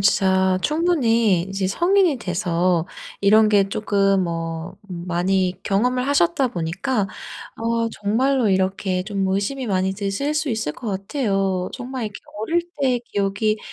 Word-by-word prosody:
진짜 190 -1 +3
충분히 235 - +2
이제 195 0 -2
성인이 350 - +3
돼서 180 -3 0 0.3
이런 215 +2 +5
게 200 -2 +3
쪼끔 195 -2 +1
뭐 165 0 -4 0.2
음 175 0 -6
많이 180 +1 +1
경험을 250 +6 +1
하셨다 285 -2 +2
보니까 195 +5 -2 0.5
어 230 0 0
정말로 235 +4 +1
이렇게 190 -1 0
좀 195 -1 -2
의심이 215 +7 -1
많이 190 -1 0
드실 200 +9 -2
수 305 -1 0
있을 220 -10 -1
것 230 +5 -7
같아요. 195 -3 -1
정말 255 -1 -5
이렇게 210 -1 -6 0.2
"어릴 335 +11 0 0.2
때 255 -3 +2
기억이 200 +2 0
200 Hz, 275 characters per minute, -22 LUFS, 190-245 Hz, 0.5 s, 이런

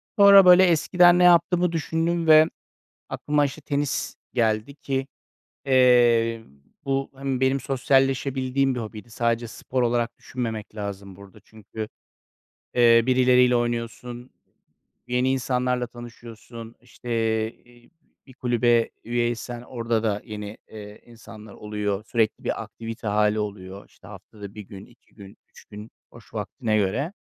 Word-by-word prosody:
Sonra, 200 -3 +8
böyle, 180 +1 +8
eskiden 175 +1 +4
ne - - +4
yaptığımı 175 0 +4
düşündüm 165 +1 -1
ve 155 0 +8 0.6
aklıma, 150 0 0
işte, 145 +2 -5
tenis 140 -1 -2 0.2
geldi 110 +3 0
ki, 135 -2 -3 0.6
eee, 120 -3 +3 0.4
bu 135 -1 -2
hem 135 -1 -3
benim 130 +1 +1
sosyalleşebildiğim 135 0 0
bir 125 - -4
hobiydi. 110 +1 -9
Sadece 115 0 -1
spor 130 +2 -3
olarak 120 -1 -1
düşünmemek 110 -4 -6
lazım 100 -2 -7
burada 100 -1 -15
çünkü, 110 0 -9 0.9
eee, 115 -1 +5
birileriyle 125 -1 +4
oynuyorsun, 120 +1 -4 0.8
yeni 125 +1 +1
insanlarla 125 -1 -1
tanışıyorsun, 115 -1 -12
işte, 125 0 -14 0.6
e 120 0 -22 0.4
bir 130 - -15
kulübe 120 -2 +1
üye 120 0 0
isen 120 0 -6
orada 115 -2 -2
da 105 -2 -1
yeni, 105 0 -8
eee, 105 -1 -11
insanlar 110 -2 -13
oluyor. 105 -1 -4
Sürekli 115 -2 -1
bir - - -2
aktivite 115 0 -9
hâli 105 +1 +1
oluyor. 100 -2 -6
İşte, - - -20
haftada 100 0 -12
1 105 - -8
gün, 100 -1 -12
2 120 - -26
gün, 100 0 -14
3 - - -18
gün 105 +1 -11 0.2
boş 115 -1 -17
vaktine 110 +1 -2
göre. 110 - -1
120 Hz, 130 wpm, -24 LUFS, 110-135 Hz, 0.9 s, Sonra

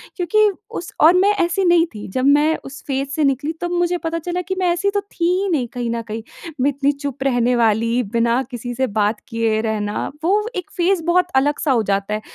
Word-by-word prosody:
क्योंकि 415 +4 +3 0.2
उस 345 - -6
और 325 +3 +8
मैं 400 +2 +4
ऐसी 345 +3 0
नहीं 345 -1 +5
थी 210 - -7
जब 255 +7 -2
मैं 295 +3 +4
उस 275 +2 -9
फेज़ 275 0 -2
से 310 - +1
निकली 280 +2 +1
तब 350 0 -2
मुझे 350 0 +1
पता 330 +1 -1
चला 355 +2 -3
कि 375 +1 -4
मैं 365 - +1
ऐसी 355 +4 0
तो 405 0 0
थी 390 -4 -4 0.2
ही 400 - -1
नहीं 280 -9 0
कहीं 245 -1 -3
न 230 0 -2
कहीं। 225 0 -6 0.4
मैं 275 - +3
इतनी 280 0 +1
चुप 280 -2 -5
रहने 245 -2 +2
वाली 230 +1 +2
बिना 235 +2 +2
किसी 245 0 -5
से 260 +1 0
बात 210 +1 +1
किए 230 -2 0
रहना 210 -2 -2 0.2
वो 395 +5 +3
एक 360 - -4
फेज़ 355 0 +2
बहुत 360 +1 +3
अलग 285 +2 +2
सा 295 - +1
हो 235 -4 +2
जाता 200 0 -1
है 215 - -2
280 Hz, 230 wpm, -20 LUFS, 235-345 Hz, 0.4 s, और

